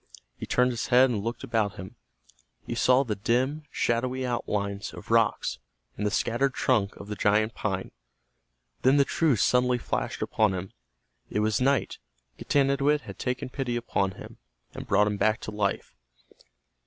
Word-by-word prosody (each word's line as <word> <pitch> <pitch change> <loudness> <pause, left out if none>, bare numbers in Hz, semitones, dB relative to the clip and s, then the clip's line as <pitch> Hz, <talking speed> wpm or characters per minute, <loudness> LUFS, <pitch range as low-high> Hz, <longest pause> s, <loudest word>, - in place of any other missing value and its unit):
He - - -7
turned 125 0 +2
his 120 0 -3
head 130 +1 +5
and 105 -4 -2
looked 115 +4 -4
about 110 -6 0
him. 95 +5 -9 0.7
He - - -4
saw 130 +2 +4
the 115 -5 -2
dim, 130 +8 0
shadowy 130 +2 -1
outlines 100 -5 -2
of - - -10
rocks, - - +2 0.4
and 105 - -1
the - - +2
shattered 125 +6 0
trunk 105 -6 +1
of 100 - -10
the 105 - -4
giant 105 +2 +2
pine. 95 -3 -3 0.9
Then 130 +2 +4
the 140 - +5
truth 145 -10 +1
suddenly 125 0 +3
flashed - - -3
upon 105 -3 +1
him. 95 +1 -6 0.6
It 105 - -1
was 110 +2 +1
night. 135 +1 +1 0.4
Getanittowit 140 +1 +2
had - - -10
taken 125 0 -3
pity 130 -2 -3
upon 100 -5 -1
him, - - -12 0.3
and - - -8
brought 105 +1 +4
him 105 -1 -1
back 110 +3 +2
to - - -6
life. 100 -9 -2
120 Hz, 165 wpm, -27 LUFS, 105-130 Hz, 0.9 s, head